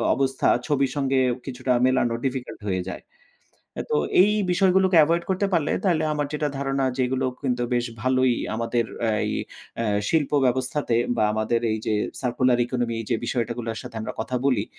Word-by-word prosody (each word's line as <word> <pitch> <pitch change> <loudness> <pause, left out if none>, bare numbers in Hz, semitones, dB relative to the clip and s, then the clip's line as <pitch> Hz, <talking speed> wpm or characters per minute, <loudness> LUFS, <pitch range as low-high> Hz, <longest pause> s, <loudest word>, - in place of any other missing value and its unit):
অবস্থা 135 0 0 0.2
ছবির 140 -3 +1
সঙ্গে 135 -2 +1 0.3
কিছুটা 130 -1 -1
মেলানো 130 -2 +2
Difficult 130 -2 -3
হয়ে 95 -1 0
যায়। - - -6 0.9
তো - - +2 0.3
এই 205 - +4 0.2
বিষয়গুলোকে 190 0 +3
Avoid 170 +2 +1
করতে 190 +2 +1
পারলে 160 -4 +1
তাইলে 165 -4 +2
আমার 145 -1 -1
যেটা 150 0 -1
ধারণা। 135 -1 0
যে - - -1
এগুলো 130 +1 -1 0.2
কিন্তু 125 -2 0
বেশ 120 0 +1 0.2
ভালোই 130 -1 +3 0.2
আমাদের 115 +1 0 0.2
এ - - +3
এই - - -1 0.5
এ - - -1 0.2
শিল্প 155 -4 +1 0.2
ব্যবস্থাতে 130 0 0 0.2
বা 110 - +2
আমাদের 110 +2 0
এই 110 - -1
যে 110 - +1 0.3
Circular 125 0 +2
Economy 120 -2 -2
এই 115 - -5
যে 115 - +3
বিষয়টা 120 -2 -1
গুলোর 115 -2 -4
সাথে 125 -2 -9
আমরা 110 - -4
কথা 125 +3 -2
বলি। 120 -7 +2
130 Hz, 175 wpm, -24 LUFS, 120-145 Hz, 0.9 s, এই